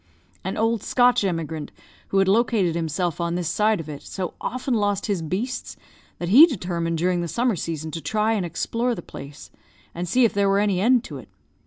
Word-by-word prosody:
"An - - -3
old 225 -1 +1
Scotch 245 -1 +3
emigrant, 160 -5 -3 0.4
who 195 - -1
had 195 0 +4
located 205 -4 +2
himself 170 +1 -2
on 170 0 -1
this 175 -2 -2
side 215 +2 +2
of 160 - -7
it, 145 -2 -7
so 185 -3 -5
often 255 +1 -2
lost 205 -3 0
his 200 -5 -1
beasts 195 +11 -4 0.4
that 175 - -4
he 280 - +9
determined 170 - -2
during 175 +1 +1
the 170 - -2
summer 235 - 0
season 160 -2 -4
to 165 +2 -5
try 215 +3 0
and 205 -4 0
explore 230 +7 -1
the - - -8
place, 140 +2 -11 0.4
and 175 0 -4
see 250 +4 +4
if 225 - +1
there 200 0 +2
were 195 - +3
any 200 -3 +1
end 245 +2 +4
to - - -8
it. - - -14
190 Hz, 205 wpm, -23 LUFS, 170-225 Hz, 0.4 s, he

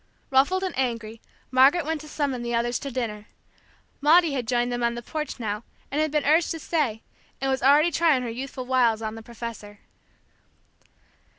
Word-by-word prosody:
Ruffled 280 +9 +3
and 375 - -3
angry, 230 -4 -3 0.3
Margaret 275 +6 +5
went 315 -1 -2
to 305 - -11
summon 280 -5 -2
the 240 0 -2
others 235 +1 0
to 280 - -5
dinner. 225 -5 -4 0.7
Maudie 320 +1 +5
had 250 -4 -3
joined 245 0 +1
them 245 0 -2
on 235 0 +1
the 240 - -6
porch 305 +1 -5
now, 210 -1 -3 0.3
and 295 +3 0
had 310 - +1
been 300 0 0
urged 320 +4 +4
to 325 - -3
stay, 285 -10 -1 0.4
and 270 0 0
was 265 - -1
already 290 +6 +5
trying 310 -5 +3
her 240 - -3
youthful 260 +2 -6
wiles 240 -4 +2
on 215 0 -3
the 225 - -8
professor. 225 -3 -9
260 Hz, 185 wpm, -25 LUFS, 235-300 Hz, 0.7 s, Margaret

